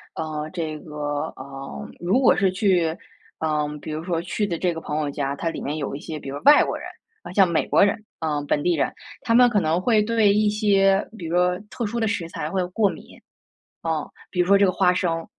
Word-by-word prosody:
嗯， 155 -1 -4
这 160 -3 -4
个， 145 -2 -4
嗯， 135 +1 -8
如 185 +9 +2
果 260 - +5
是 195 -1 +2
去， 180 -5 +1 0.4
嗯， 150 -1 -1
比 155 - -7
如 155 +1 -4
说 170 -2 -1
去 205 +4 -2
的 170 -4 -2
这 180 0 0
个 165 - -6
朋 150 -1 -3
友 150 -2 -1
家， 140 -1 -2
它 165 +3 -2
里 - - -6
面 150 +2 -3
有 140 -2 -3
一 - - -6
些 155 -1 -6
比 - - -10
如 140 - -5
外 295 +1 +8
国 - - -3
人， - - -9 0.5
像 190 -1 +5
美 170 - +1
国 - - +4
人， 210 +1 -1 0.2
啊， 150 -2 -1
本 145 0 0
地 175 +3 +2
人， 140 - 0 0.3
他 230 - 0
们 245 0 +7
可 210 -4 +2
能 160 +1 +1
会 215 +1 +3
对 220 -2 +3
一 210 0 +3
些 200 -2 +3
比 170 - -6
如 170 - -2
说 180 0 +2
特 235 - -4
殊 230 +3 -3
的 225 - +1
食 180 -5 -2
材 155 -2 -4
会 185 0 0
过 200 +2 +1
敏。 - - -10 0.7
嗯， 160 -2 -1 0.2
比 180 - 0
如 - - +1
说 200 +1 +6
这 200 - +5
个 185 - +2
花 180 -1 +3
生 165 -2 -1
175 Hz, 255 characters per minute, -23 LUFS, 155-200 Hz, 0.7 s, 外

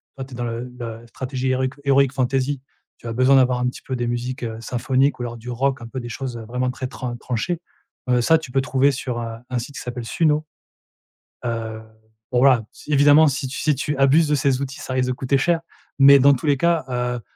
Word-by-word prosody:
Toi, 135 - -6
tu 130 - -14
es - - -6
dans 120 - -3
le 120 +1 -4
la 115 -1 -7
stratégie 130 +2 -3
héroïque 130 0 0
héroïque 140 -1 +3
fantaisie. 135 +1 0 0.4
Tu - - -11
as 115 - -3
besoin 130 +3 +5
d'avoir 125 -1 +3
un 125 - 0
petit 125 - -5
peu 130 - -4
des 120 -1 -2
musiques, 120 +1 -3
heu, 110 -1 -4
symphoniques 130 +4 0
ou - - -3
alors 120 -1 -5
du 120 +2 -9
rock 130 +1 -1
un 115 - -7
peu 130 +2 -6
des 120 - -7
choses, 125 0 -5
heu, 115 - -8
vraiment 125 +3 -1
très 130 0 -5
tran 125 -2 -5
tranchées, 130 +9 -3 0.5
heu, 125 -1 +3
ça 160 +7 +5
tu 155 -6 -9
peux 135 - +2
trouver 135 0 +2
sur, 125 -2 -4
heu, 115 -1 -5
un 125 - -1
site 135 +4 -8
qui - - -6
s'appelle 120 -1 -6
Suno, 155 +3 +1 1.0
heu, 115 -2 -4 0.5
bon 125 - +2
voilà. 125 -2 +5
Si 150 - -8
évidemment 145 +2 +6
si 135 0 -2
tu 130 - -6
si 150 -1 +2
tu 145 +2 -2
abuses 145 +3 +4
de 150 - +2
ces 135 -2 +1
outils, 135 0 -6
ça 130 - -5
risque 130 -1 +1
de - - +1
coûter 135 +2 0
cher, 170 +4 +2 0.4
mais 140 0 +8
dans 140 +2 +6
tous 130 +4 -5
les 145 -2 +3
cas, 170 0 +1
heu, 125 -1 -2
130 Hz, 240 wpm, -22 LUFS, 120-140 Hz, 1.0 s, mais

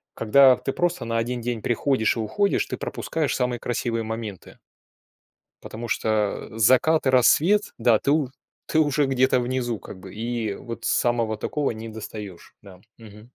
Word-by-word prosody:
когда 130 +3 +5
ты 135 - -3
просто 175 -7 -1
на 115 0 -1
1 120 +2 -2
день 120 -1 -3
приходишь 120 0 +1
и - - -2
уходишь, 200 - 0
ты - - -5
пропускаешь 155 -3 -2
самые 125 -2 -1
красивые 115 -1 -2
моменты. 110 -4 -7 1.1
Потому 115 +2 -7
что 110 -2 -1
закат 130 +8 +4
и - - +4
рассвет, 165 - +4
да, 115 -2 +3
ты 140 - 0
у 150 -3 +1 0.4
ты 160 - +1
уже 145 -1 +2
где-то 130 -1 +2
внизу 120 -2 -2
как 95 - -11
бы, 95 0 -11
и 115 -2 -3
вот 115 +3 -8
самого 115 -3 +1
такого 145 +6 -2
не 115 0 -7
достаешь. 105 -4 -9
Да, 95 -2 -15 0.2
мгм. 105 -2 -14
120 Hz, 160 wpm, -24 LUFS, 110-130 Hz, 1.1 s, когда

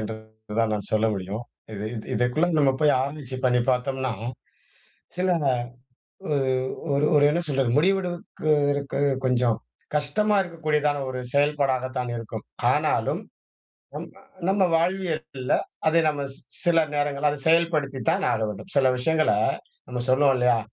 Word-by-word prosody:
என்று 110 +1 -4 0.4
தான் 115 -1 +2
நான் 105 -2 -5
சொல்ல 110 +1 +3
முடியும். 100 +4 -4 0.3
இது 100 +1 -5
இது 110 - -7
இதுக்குள்ள 125 +10 +1
நம்ம 140 -2 +4
போய் 150 -1 +5
ஆராய்ச்சி 135 -1 -4
பண்ணி 125 -1 +4
பாத்தோம்னா, 130 0 -1 1.0
சில 185 +1 0 1.0
ஒ 145 - +2 0.6
ஒரு 140 +2 +2
ஒரு 145 - +5
என்ன 170 +4 +1
சொல்றது, 135 -4 +1
முடிவெடுக்கு 175 -2 0 0.2
இருக்கு 140 -1 -3 0.3
கொஞ்சம் 125 -3 +2 0.4
கஷ்டமா 205 +9 +1
இருக்கக்கூடியதான 150 -4 0
ஒரு 130 - -4
செயல்பாடாக 140 -3 +2
தான் 125 -1 -2
இருக்கும். 115 -1 -6 0.3
ஆனாலும், - - 0 0.7
நம் - - -6 0.4
நம்ம 195 0 +3
வாழ்வியல்ல, 165 -7 -2 0.4
அதை 165 +1 +4
நம்ம 145 -2 -1
ஸ் - - -11 0.3
சில 170 -1 +4 0.2
நேரங்கள்ல, 145 0 +1
அதை 145 - -6
செயல்படுத்தித்தான் 155 -6 +2
ஆக - - -1
வேண்டும். 105 - -7
சில 135 -2 +5
விஷயங்கள 155 +4 +2 0.6
நம்ம 125 - -4
சொல்லுவோம் 135 +1 +4
இல்லையா, 125 -1 +3
140 Hz, 135 wpm, -25 LUFS, 125-155 Hz, 1.0 s, போய்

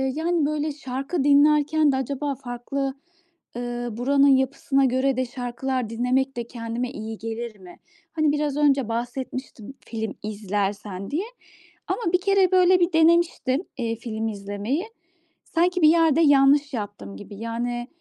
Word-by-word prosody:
yani, 330 0 +1
böyle, 305 0 -1
şarkı 275 +2 -3
dinlerken 295 +1 +4
de - - 0
acaba 280 +2 -2
farklı, 265 +2 -4 0.6
ııı, 240 -2 -4
buranın 275 +3 +3
yapısına 270 +1 +2
göre 260 +1 +1
de 255 - +1
şarkılar 245 0 -3
dinlemek 250 +3 0
de 235 - -4
kendime 235 +1 -4
iyi 220 -3 -6
gelir 225 -1 -6
mi? 180 -2 -14 0.3
Hani, 310 -2 +2
biraz 295 -1 -1
önce 275 -5 +2
bahsetmiştim 245 0 -5
film 220 -2 -4
izlersen 205 -1 -3
diye 335 +8 -1 0.6
ama 390 -8 -2
1 360 - +3
kere 390 -1 +3
böyle 370 0 +5
bir 345 0 +2
denemiştim, 325 -3 +3
eee, 230 -2 -2
film 225 -1 -4
izlemeyi. 205 - -3 0.6
Sanki 355 +2 0
bir 305 - +8
yerde 325 -1 +4
yanlış 285 -1 +4
yaptım 205 - -6
gibi. 200 - -10
Yani, 240 +3 -3
265 Hz, 140 wpm, -24 LUFS, 230-295 Hz, 0.6 s, bir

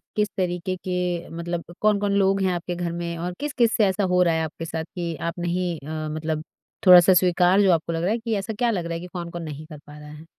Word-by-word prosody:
किस 210 0 +2
तरीके 180 0 -1
के 180 -2 -2
मतलब 170 0 -3 0.2
कौन-कौन 205 -1 +2
लोग 195 0 +2
हैं 190 - +2
आपके 175 0 -4
घर 175 -1 -3
में? 170 0 -4
और 175 +2 -4
किस-किस 260 -6 +1
से 215 - +4
ऐसा 195 +1 0
हो 180 -1 +2
रहा 170 -2 +2
है 160 0 0
आपके 160 +1 -6
साथ 160 0 -4
कि 170 -2 -3
आप 170 +2 -4
नहीं 175 0 -1
अ, 155 +2 -5
मतलब 155 0 -3 0.4
थोड़ा-सा 180 0 +9
स्वीकार 180 +2 +4
जो 190 -2 +5
आपको 165 0 -1
लग 165 - -2
रहा 185 - +1
है 230 - 0
कि 225 -1 -2
ऐसा 200 +3 -4
क्या 240 -1 +2
लग 180 -6 -2
रहा 170 - -3
है 165 - -3
कि 180 - -8
कौन-कौन 170 -1 -5
नहीं 155 -1 -7
कर 155 -1 -11
पा 145 +1 -14
रहा 150 0 -11
है? 155 +2 -12
175 Hz, 255 wpm, -24 LUFS, 165-190 Hz, 0.4 s, थोड़ा-सा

